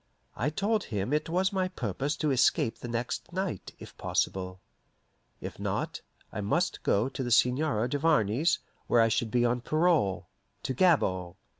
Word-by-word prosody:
I 120 +8 0
told 205 +6 0
him 105 +3 -2
it 150 +2 0
was 190 +4 +1
my 185 -1 +1
purpose 135 - -3
to 155 -3 0
escape 125 -3 +2
the - - -6
next 120 +7 -3
night, 185 - -4
if - - -12
possible. 95 -1 -1 0.8
If - - -7
not, - - -3 0.3
I - - -4
must 170 - 0
go 105 +5 +2
to 135 - -5
the 125 - -2
Seigneur 125 0 +2
Duvarney's, 145 - +2 0.3
where 120 - +4
I 115 - +4
should 115 0 0
be 120 +2 +2
on 120 +1 +1
parole 155 - +1 0.4
to 130 - -2
Gabord. 95 - +2
130 Hz, 160 wpm, -29 LUFS, 110-165 Hz, 0.8 s, where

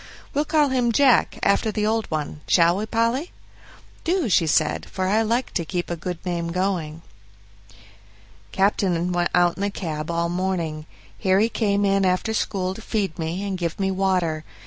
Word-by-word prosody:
We'll 295 +2 +1
call 300 -2 +3
him 250 -2 +1
'Jack', 260 +1 +4
after 205 +2 +2
the 210 0 -1
old 220 +1 0
one 150 -1 -4
shall 170 +1 +4
we, 215 +2 -3
Polly?" 230 - 0 0.7
"Do," 340 - 0
she 170 -3 +3
said, 155 0 +1
"for 185 -1 -2
I 210 +4 +3
like 235 +3 -1
to 170 - 0
keep 175 +2 -3
a - - -1
good 175 +1 -5
name 170 -2 -2
going." 170 -4 -2 1.5
Captain 185 -3 +1
went 175 0 +1
out 175 -1 +3
in - - -6
the 200 - +1
cab 155 -5 -5
all 170 0 0
the 170 - -4
morning. 170 -4 -2 0.3
Harry 195 +3 +3
came 205 -3 +1
in 195 0 +2
after 185 +4 +1
school 190 -3 -1
to 225 - -10
feed 200 -6 -2
me 165 +4 -3
and 190 -2 -3
give 170 0 -3
me 195 -1 +1
water. 185 -5 0
190 Hz, 180 wpm, -23 LUFS, 170-215 Hz, 1.5 s, Jack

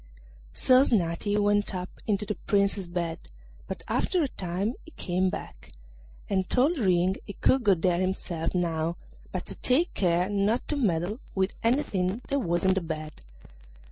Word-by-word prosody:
So 255 0 +5
Snati 205 -3 +1
went 205 -1 +2
up 180 0 -6
into 210 -1 +1
the 210 - -1
Prince's 200 -2 0
bed, 170 -1 -3 0.5
but - - -6
after 360 -3 +1
a - - +1
time 190 0 -2
he - - -13
came 185 +1 +1
back, 125 - -8 0.5
and 190 -2 0
told 290 +6 +2
Ring 185 -2 +2
he 200 - -6
could 260 +4 +2
go 200 -3 +5
there 175 +1 +1
himself 185 -3 -2
now, 165 -1 0 0.4
but - - -4
to - - -4
take 300 +8 +1
care 180 -1 +2
not 205 +3 0
to 300 - +1
meddle 200 - 0 0.2
with 190 0 +1
anything 225 -5 0
that 280 - +1
was 175 -7 0
in 190 0 +4
the 190 - 0
bed. 155 - -6
190 Hz, 165 wpm, -27 LUFS, 175-210 Hz, 0.5 s, So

